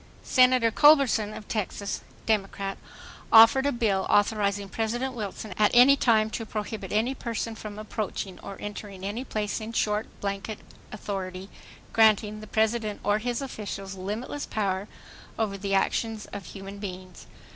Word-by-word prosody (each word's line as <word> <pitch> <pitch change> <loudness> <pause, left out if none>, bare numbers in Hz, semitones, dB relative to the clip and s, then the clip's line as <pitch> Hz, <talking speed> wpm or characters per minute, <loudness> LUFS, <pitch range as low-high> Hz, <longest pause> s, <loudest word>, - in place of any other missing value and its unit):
Senator 255 -3 +4
Culberson 275 -7 +5
of 215 - -9
Texas, 200 -2 -3 0.2
Democrat, 195 -2 -1 0.5
offered 230 +5 +8
a - - +2
bill 210 -6 0
authorizing 205 -1 +2
President 235 +6 -2
Wilson 210 -2 -5
at 210 - +5
any 255 +3 +8
time 220 -5 +3
to 225 - -3
prohibit 215 0 -5
any 225 +5 +1
person 230 -3 -4
from 215 -1 -8
approaching 210 -3 -4
or 195 - -8
entering 205 -2 -7
any 215 +6 -3
place—in 215 -1 -3
short 210 -1 0
blanket 200 +2 -4 0.3
authority 190 -2 -5 0.4
granting 215 -1 +4
the 215 - -10
President 220 -1 0
or 205 +1 +2
his 245 +3 -2
officials 195 -6 -6
limitless 210 +9 -5
power 195 -2 -1 0.5
over 215 -3 -1
the 195 0 -1
actions 220 +2 0
of 200 -3 -6
human 195 0 -9
beings. 185 -2 -8
215 Hz, 140 wpm, -27 LUFS, 200-225 Hz, 0.5 s, offered